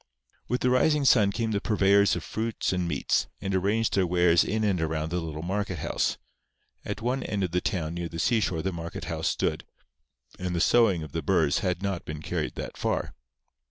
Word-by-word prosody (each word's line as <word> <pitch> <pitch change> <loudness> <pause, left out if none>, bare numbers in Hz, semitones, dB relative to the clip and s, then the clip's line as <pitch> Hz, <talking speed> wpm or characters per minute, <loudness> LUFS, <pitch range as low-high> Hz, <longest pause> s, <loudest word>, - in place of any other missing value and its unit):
With 125 +2 -1
the 125 - +2
rising 150 +3 +3
sun 105 -6 +5
came 115 +1 -2
the 100 -1 0
purveyors 100 -2 +3
of - - -4
fruits 110 -3 -2
and 90 -1 -1
meats, 75 -5 0
and 95 - -3
arranged 100 +4 +1
their 95 -2 +2
wares 85 -1 +4
in 110 +2 -1
and 95 -5 +1
around 80 0 -1
the 90 - 0
little 80 -2 -5
market 95 0 -2
house. - - -1 0.7
At 110 - -5
one 125 +3 0
end 100 -5 -2
of 90 - -1
the 90 +1 0
town 80 -3 -2
near 85 -1 -4
the 85 - -7
seashore 100 -4 +1
the 95 0 -1
market 85 0 -6
house - - -2
stood; - - -1 0.8
and 90 -1 -2
the - - 0
sowing 100 -4 +4
of 75 - -9
the - - -2
burrs 70 - +2
had 90 0 -2
not 95 -3 -2
been 75 -3 -7
carried - - -3
that - - -6
far. - - -1
95 Hz, 205 wpm, -27 LUFS, 85-110 Hz, 0.8 s, sun